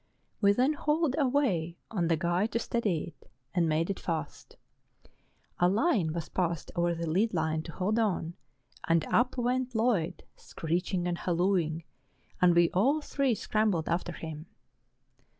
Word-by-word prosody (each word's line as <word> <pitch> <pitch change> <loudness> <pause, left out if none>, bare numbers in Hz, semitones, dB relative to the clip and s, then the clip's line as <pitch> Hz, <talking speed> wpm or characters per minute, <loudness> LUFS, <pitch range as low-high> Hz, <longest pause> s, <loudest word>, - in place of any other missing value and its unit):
We 200 -1 +6
then 255 +8 +2
hauled 300 -1 0
away 245 - +1
on 180 -6 0
the 165 -1 +2
guy 175 +5 +1
to 230 - -2
steady 205 -9 -1
it, - - -23 0.2
and 170 -3 +2
made 160 +4 +1
it 195 - -5
fast; 160 -5 -5 1.0
a 175 - +4
line 205 - +2
was 165 0 -4
passed 170 -4 -2
over 175 0 +1
by - - -8
the 170 - -2
lead 195 +6 +1
line 160 -1 0
to 165 - -8
hold 205 +7 0
on, 180 -6 0 0.5
and 165 -1 +3
up 245 +2 +2
went 250 0 -1
Lloyd, 195 -8 0
screeching 175 +2 -2
and 175 -1 -2
hallooing, 170 -2 0 0.6
and 175 -1 +5
we 170 0 +4
all 270 +12 +2
three 275 -4 0
scrambled 210 -6 0
after 175 +1 -1
him. 160 -1 -7
180 Hz, 155 wpm, -29 LUFS, 165-225 Hz, 1.0 s, We